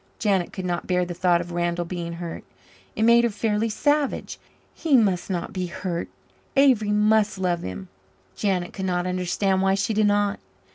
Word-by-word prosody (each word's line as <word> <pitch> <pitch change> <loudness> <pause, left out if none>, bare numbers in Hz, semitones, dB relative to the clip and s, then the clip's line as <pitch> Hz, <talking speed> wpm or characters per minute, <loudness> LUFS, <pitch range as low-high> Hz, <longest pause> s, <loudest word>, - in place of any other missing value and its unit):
Janet 195 -5 0
could 190 -2 -6
not 175 -1 -2
bear 180 -1 +1
the 175 - -5
thought 175 0 +2
of 175 0 -8
Randall 175 0 -1
being 170 -1 -5
hurt; 170 0 -6 0.5
it 220 - 0
made 235 +1 +6
her 235 - +3
fairly 215 +1 -1
savage. 290 +6 0 0.3
He 310 -5 +3
must 195 -6 +1
not 175 -3 -3
be 185 -1 -2
hurt 175 -1 -4 0.5
Avery 260 -7 +4
must 210 0 +3
love 180 -2 0
him. 95 0 -6 0.5
Janet 185 -4 -1
could 190 - -4
not 180 -1 0
understand 185 +1 0
why 195 0 +3
she 200 +3 -1
did 215 0 +3
not. 205 0 +1
190 Hz, 180 wpm, -24 LUFS, 175-210 Hz, 0.5 s, made